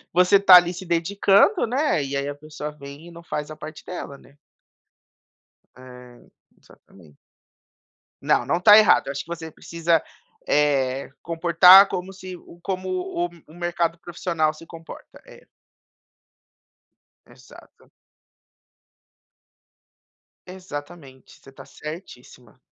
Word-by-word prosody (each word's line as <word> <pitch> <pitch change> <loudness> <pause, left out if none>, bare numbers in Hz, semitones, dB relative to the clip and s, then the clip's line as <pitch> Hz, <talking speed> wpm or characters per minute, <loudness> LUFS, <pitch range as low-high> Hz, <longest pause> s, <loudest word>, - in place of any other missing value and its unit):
você 180 +3 +4
tá 195 -2 +6
ali 175 0 +4
se 180 +1 -10
dedicando, 195 - +2
né, 255 - 0
e 140 +1 -5
aí 140 +1 -3
a 145 - -5
pessoa 150 0 -8
vem 145 +2 -13
e - - -13
não 170 0 -14
faz 150 -2 -5
a 155 - -9
parte 155 0 -11
dela, 175 -6 -8
né. 140 +1 -22 1.4
É 125 -1 -15 0.3
exatamente. 80 -7 -21 1.1
Não, - - +1
não 170 - -1
tá 210 +3 +7
errada. 215 -9 +4
Acho 140 - -5
que - - -16
você 165 -1 -8
precisa, 165 0 -1 0.5
eh, 135 -3 0
comportar 175 +3 +6
como 185 0 -6
se 185 -1 -10 0.3
como 185 -1 -4
o 180 -1 -3 0.2
o 155 - -17
mercado 170 -1 -2
profissional 165 -3 -2
se 160 +2 -15
comporta 165 0 -13
é. - - -17 1.8
Exato. - - -19 2.6
Exatamente, 145 -6 -11
você 135 - -16
tá 135 - -14
certíssima. 130 - -12
165 Hz, 120 wpm, -22 LUFS, 145-180 Hz, 2.6 s, tá